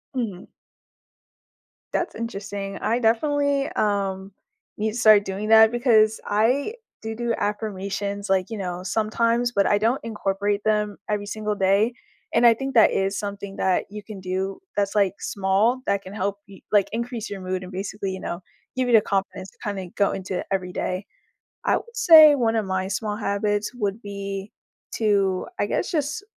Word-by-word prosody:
Mhm. 210 -8 -4 1.5
That's - - -1
interesting. 200 -3 -5
I 230 +3 0
definitely, 280 +4 +1
um, 195 -2 -1 0.5
need 215 +1 -1
to 220 - -6
start 215 -3 +6
doing 200 +3 -4
that 220 0 +7
because 220 -3 +3
I 245 - +1 0.3
do 220 0 -5
do 235 0 -1
affirmations, 200 -1 -3
like, 190 -1 +1
you 225 - -5
know, 180 -2 -4
sometimes, 230 +4 +1
but 200 -3 +3
I 205 - +3
don't 230 +5 0
incorporate 205 -2 -1
them 210 -2 +1
every 210 -1 -1
single 210 0 -3
day, 200 +4 +2 0.4
and 235 +1 +4
I 235 - +8
think 270 +4 -5
that 225 -3 +6
is 195 0 0
something 200 -1 -5
that 185 -1 +1
you 210 0 -8
can 210 -3 -9
do 190 +1 -3 0.2
that's, 200 0 0
like, 200 -3 +3
small 200 +6 +1
that 200 0 +1
can 190 0 -10
help 200 -1 -2
y 195 - -14
like 200 -2 +3
increase 235 0 -4
your 200 - -6
mood 185 0 -3
and 180 - -9
basically, 195 +1 -4
you 190 - -5
know, 175 0 -5 0.3
give 255 -1 0
you 240 - +2
the 220 - +7
confidence 195 -1 -3
to, - - -30
kinda, 195 -3 -4
go 200 - +2
into 190 -1 -4
every 185 -2 -2
day. 185 +2 -3 0.6
I - - +3
would 470 0 -10
say 310 -6 +9
one 230 -4 +1
of 220 -2 0
my 190 0 -1
small 210 +1 -2
habits 205 0 -1
would 210 -2 -3
be 200 -1 -6 0.4
to, 200 -4 +1
I - - +2
guess, - - -1
just 300 +1 -2
205 Hz, 175 wpm, -24 LUFS, 195-225 Hz, 1.5 s, say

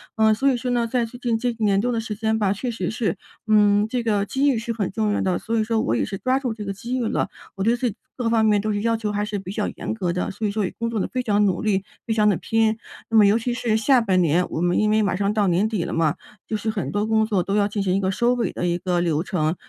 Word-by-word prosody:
呃， 220 0 +4
所 270 +6 +2
以 - - +1
说 250 +1 -3
呢， 235 -1 +1
在 240 0 0
最 240 +2 -11
近 240 -2 0
这 245 +2 -1
1 235 - -4
年 200 -2 +3
多 245 +1 0
的 230 - 0
时 220 -1 -4
间 220 +1 0
吧， 200 -1 +2
确 245 +5 -4
实 190 -6 -3
是 220 -7 -1 0.3
嗯， 210 -1 +4
这 250 0 -1
个 205 -3 +1
机 275 +6 +1
遇 255 - +1
是 230 +1 -3
很 205 -5 -2
重 215 0 0
要 - - 0
的， 185 -2 +1
所 230 +1 -2
以 - - +2
说 225 0 0
我 115 - 0
也 - - 0
是 195 - -5
抓 255 +4 +1
住 250 -5 -2
这 215 -1 -7
个 200 - -3
机 240 +6 -4
遇 250 - -1
了， - - -1 0.3
我 195 - -3
对 230 +2 +3
自 245 0 -1
己 205 - -8 0.2
各 240 -2 0
方 225 -1 +3
面 210 -1 +3
都 215 +1 -1
是 205 0 -1
要 230 0 +1
求 215 -2 -2
还 205 0 -1
是 210 0 -3
比 190 -1 -7
较 210 +1 -2
严 - - -4
格 180 -6 -2
的， 180 - -2
所 215 +2 -3
以 - - -1
说 210 0 -1
也 - - -5
工 230 0 -1
作 225 -2 -2
地 - - -1
非 255 - -1
常 210 -2 +2
努 190 - 0
力， 195 -3 +1 0.2
非 225 - +1
常 210 -1 +3
地 195 - +2
拼。 225 -1 +1 0.3
那 225 - +3
么 210 - +7
尤 200 +2 +4
其 240 +1 -2
是 235 -2 0
下 250 +4 +4
半 190 -5 +2
年， 170 +2 +2
我 160 - -3
们 175 0 +2
因 215 - +2
为 215 +1 +3
马 200 -3 +1
上 200 +2 0
到 210 -2 +2
年 185 +4 +2
底 215 -6 -2
了 - - -4
嘛， 165 0 +1 0.3
就 220 - -2
是 215 +1 -2
很 215 -2 -3
多 205 +1 0
工 220 0 +2
作， 200 -5 0
都 195 - -2
要 205 -1 +3
进 205 0 -3
行 185 -2 +1
一 - - +2
个 190 -1 0
收 235 +5 +2
尾 240 - -1
的 180 - -2
一 175 0 +1
个 180 -1 -1
流 160 -3 +1
程。 160 -4 -1
215 Hz, 340 characters per minute, -23 LUFS, 195-230 Hz, 0.3 s, 么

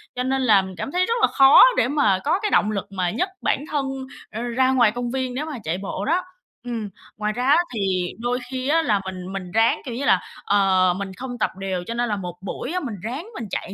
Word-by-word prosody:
Cho 250 - -1
nên 265 +1 0
là 210 -6 +5
mình 190 -1 -8
cảm 275 - -4
thấy 365 +1 +2
rất 460 - 0
là - - +6
khó 270 0 +7
để - - +3
mà 260 -10 +2
có 325 +7 +1
cái 420 - -2
động 215 - +3
lực 200 -1 -4
mà 185 -2 -1
nhấc 365 - -1
bản 280 - 0
thân, 285 -2 0 0.5
ơ, 220 +2 -5
ra 255 +2 +1
ngoài 240 -5 +4
công 240 0 -4
viên 260 -1 -2
nếu 290 +4 -3
mà 300 -5 -6
chạy 165 +3 -2
bộ 195 +1 -4
đó. 345 +5 +2 0.4
Ừm, 230 -4 -4 0.3
ngoài 210 0 -1
ra 245 - -3
á 290 +4 +5 0.2
thì 220 - -3 0.4
đôi 245 +1 -1
khi 260 0 -3
á 325 +2 +3
là 210 -9 +1
mình 185 0 -6
mình 185 -2 -6
ráng, 225 +2 +3
kiểu 240 -3 -5
như 280 +3 -3
là, 185 - +4 0.2
ờ, 190 -3 +3
mình 200 -1 -5
không 250 -1 -6
tập - - +1
đều 190 -2 -3
cho 230 - -3
nên 240 0 -1
là 210 - 0
một 180 -3 -6
buổi 225 - -5
á 365 - 0
mình 240 - -5
ráng 270 - -5
mình 230 -4 -5
chạy 195 - -4
235 Hz, 260 wpm, -23 LUFS, 195-265 Hz, 0.5 s, khó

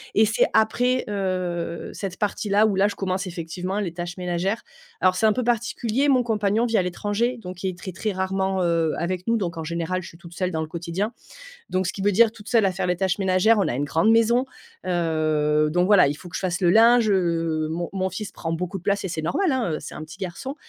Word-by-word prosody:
et 220 - +6
c'est 215 +1 +2
après, 245 +4 +2
heu, 185 -4 -3
cette 190 -2 -5
partie-là 210 0 +1
où 210 - +2
là, 195 +2 +4
je 205 - -4
commence 190 0 -2
effectivement 180 +3 -4
les 175 -5 -3
tâches 175 +1 -6
ménagères. 180 +4 -2 0.4
Alors, 185 0 +3
c'est 220 +3 +3
un 215 - +4
peu 250 - -1
particulier, 240 +3 0
mon 255 -2 +4
compagnon 215 0 +1
vit 230 -2 +1
à - - +4
l'étranger 205 +7 -1
donc 180 -4 -9
il 190 - +1
est 180 - -7
très, 185 - -7
très, 210 +4 -3
rarement, 190 0 -1
heu, 165 -2 +1
avec 180 +3 -3
nous, 230 0 +3
donc 175 -4 -3
en 160 - -4
général, 170 +3 -2
je - - -10
suis 165 - -13
toute 170 0 -13
seule 180 +1 -1
dans 160 -3 -2
le 155 - -3
quotidien, 175 +6 -3 0.6
donc 185 0 0
ce - - -2
qui 195 - -6
veut 205 - +3
dire 225 +3 +4
toute 210 0 -13
seule 230 -3 +3
à 190 - +2
faire 180 -1 -2
les 180 - +1
tâches 190 +1 0
ménagères, 195 +3 +3
on - - +1
a - - -1
une 145 - 0
grande 165 +9 +2
maison, 235 +3 +3 0.4
heu, 155 -3 +1
donc 180 +2 +2
voilà. 195 -8 +6
Il 145 - -1
faut 180 - -11
que 175 - -15
je - - -3
fasse 180 -1 -1
le 175 -2 +4
linge, 230 +2 +6
heu, 165 -4 +1
mon 170 +2 -2
mon 190 -1 -1
fils 195 +3 -6
prend 165 - -5
beaucoup 180 +4 -3
de 175 - -15
place 200 +1 0
et - - -2
c'est 160 - -3
normal, 305 - 0
hein, 235 -11 0
heu, - - -1
c'est - - -9
un 155 - -7
petit 155 - -12
garçon 195 +9 -5
185 Hz, 250 wpm, -24 LUFS, 170-215 Hz, 0.6 s, et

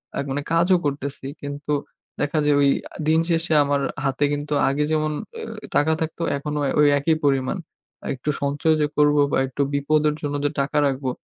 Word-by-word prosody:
আ - - -3
মানে 145 +2 -2
কাজও 175 +2 +4
করতেছি 140 -1 -3 0.2
কিন্তু 145 +1 -5 0.5
দেখা 150 +1 0
যাবে 145 -1 +4 0.4
দিন 160 +1 +4
শেষে 165 0 +1
আমার 140 0 0 0.2
হাতে 135 +2 0
কিন্তু 145 +1 -3 0.2
আগে 145 +2 0
যেমন 155 0 +1 0.3
আ - - -6 0.3
টাকা 160 +2 +3
থাকতো 160 +1 -3 0.2
এখনো 150 +1 -4 0.2
ওই 150 - +6
একই 160 +3 +2
পরিমাণ। 135 +5 +1 0.5
আর - - -6
একটু 130 +4 -5
সঞ্চয় 145 +3 +1
যে - - +4
করব 150 0 +4 0.2
বা - - +2
একটু 135 +2 -4
বিপদের 150 +1 +2
জন্য 145 -1 -2
যে - - +3
টাকা 150 +2 -2
রাখবো 135 -1 -2
145 Hz, 175 wpm, -23 LUFS, 140-155 Hz, 0.5 s, ওই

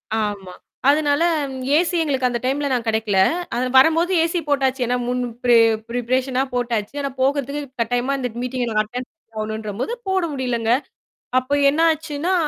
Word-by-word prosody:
ஆமா. 205 -4 -3 0.4
அதனால, 295 +1 +3 0.3
ம் 260 -1 -6 0.2
ஏசி 350 +1 +1
எங்களுக்கு 265 -4 0
அந்த 240 -1 -2
டைம்ல 280 +2 0
நான் 240 -2 -1
கிடைக்கல. 220 -3 +1 0.4
அது 245 - 0
நா - - -2
வரம்போது 325 +6 +5
ஏசி 335 +1 0
போட்டாச்சு. 270 -2 +1
ஏன்னா 250 0 +1
முன் 250 0 -1 0.2
பிரே 240 -1 +5 0.3
ப்ரிபரேஷனா 255 +2 0
போட்டாச்சு. 235 -1 -2
ஆனா 275 - -2
போகுறதுக்கு 280 +1 0 0.2
கட்டாயமா 245 +4 0
அந்த 250 -2 -2
மீட்டிங்ல 250 -1 -2
நாங் 215 -1 +2
அட்டெண்ட் 245 +4 -6
பண்ண 325 - -71 0.2
போணுன்றபோது, 215 - -3
போட 380 -1 +1
முடியலங்க. 240 -4 -1 0.7
அப்ப 255 +3 0
என்னாச்சுன்னா, 320 +2 +1
255 Hz, 155 wpm, -21 LUFS, 235-285 Hz, 0.7 s, வரம்போது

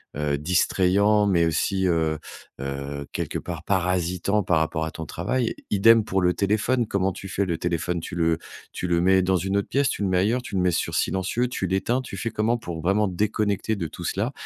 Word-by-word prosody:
heu, 75 -1 0
distrayant 95 +5 +3
mais 85 -4 +3
aussi, 95 +4 0
heu, 80 -2 +1 0.4
heu 70 +1 -5
quelque - - -3
part 85 -3 -6
parasitant 90 +1 0
par 85 -3 +2
rapport 80 0 -1
à 80 - -5
ton 80 -2 -7
travail. 115 - -2 0.2
Idem 110 +2 +5
pour 95 -2 0
le 90 0 +3
téléphone. 110 +4 +1
Comment 95 -1 0
tu 95 +2 -8
fais 95 +1 -1
le 85 -3 -2
téléphone? 85 0 -1
Tu 85 - -7
le 80 -1 +2 0.3
tu 90 - -4
le 85 -1 +2
mets 95 +1 +4
dans 95 0 +2
une 95 +3 0
autre 100 - -1
pièce? 140 0 +1
Tu - - -2
le 100 - +1
mets 90 -1 +2
ailleurs? 115 +6 +1
Tu 115 -4 -7
le 95 - +2
mets 90 -1 +3
sur 85 - -1
silencieux? 95 +6 0
Tu 95 - -2
l'éteins? 95 +7 0
Tu 125 - -8
fais 105 +4 -3
comment 115 +2 +1
pour 85 -7 -6
vraiment 100 +3 +2
déconnecter 105 +2 0
de 85 -5 -3
tout 90 - -9
cela 100 +9 -1
95 Hz, 215 wpm, -24 LUFS, 85-105 Hz, 0.4 s, Idem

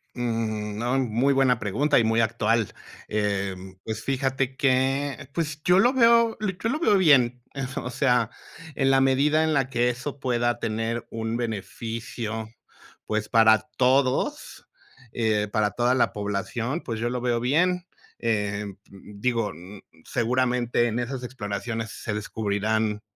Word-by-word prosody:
Mm, 110 -3 -2
no, 120 +3 0
muy 125 +2 +1
buena 130 -3 +3
pregunta 120 +10 +2
y - - +3
muy 115 +1 +2
actual. 115 -1 +1 0.3
Em, 95 -3 -2
pues 110 0 -5
fíjate 135 0 -1
que 135 0 0
pues, 150 -3 -3
yo 180 +1 +5
lo 245 +5 +4
veo 235 -2 +4
yo 210 +1 -2
lo 305 - -1
veo 210 -12 +4
bien. 125 -9 +4 0.4
O 125 - -5
sea, 125 -2 +2 0.5
en 135 -1 +2
la 135 0 +4
medida 140 +4 +3
en 160 0 +1
la 135 -3 +1
que 120 -2 +2
eso 130 +4 -5
pueda 120 -2 0
tener 115 +1 -2
un 115 0 -3
beneficio, 115 0 -4 0.6
pues, 105 0 -2
para 110 -2 +5
todos, 130 0 +1 0.4
eh, 110 -3 0
para 105 -1 +1
toda 120 +1 +1
la 130 - +2
población, 110 - -3
pues, 115 -3 -5
yo 120 +1 -1
lo 125 +1 -2
veo 120 -1 +1
bien. 175 +8 +1 0.3
Eh, 105 -2 -1 0.3
digo, 105 +2 -3 0.5
seguramente 120 0 +1
en 115 +1 -2
esas 125 +1 -4
exploraciones 110 -1 -4
se 110 - -5
descubrirán, 105 0 -1
120 Hz, 140 wpm, -25 LUFS, 110-135 Hz, 0.6 s, yo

